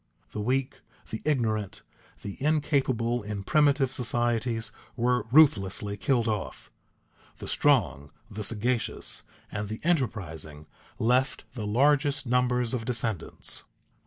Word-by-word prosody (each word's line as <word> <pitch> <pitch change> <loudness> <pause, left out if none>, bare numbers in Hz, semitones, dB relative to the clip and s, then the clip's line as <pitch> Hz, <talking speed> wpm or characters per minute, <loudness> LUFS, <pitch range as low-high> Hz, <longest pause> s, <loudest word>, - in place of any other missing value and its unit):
The 105 - -4
weak, 130 +4 -1 0.3
the 110 - -4
ignorant, 110 -9 0 0.4
the 100 - -5
incapable 135 -6 +1
in 105 -1 -5
primitive 140 0 +3
societies 120 -2 0 0.2
were 125 -2 +1
ruthlessly 105 -8 +4
killed 120 +2 +1
off. 105 -3 -3 0.7
The - - -8
strong, 70 +2 +2 0.2
the 105 +1 -6
sagacious, 115 +3 -1 0.3
and 105 -1 -3
the 110 - -5
enterprising 95 - -1 0.3
left 125 +4 +2
the 110 -5 -4
largest 140 +4 +3
numbers 125 -1 +1
of 120 -3 -1
descendants. 115 -5 -2
120 Hz, 110 wpm, -28 LUFS, 105-130 Hz, 0.7 s, ruthlessly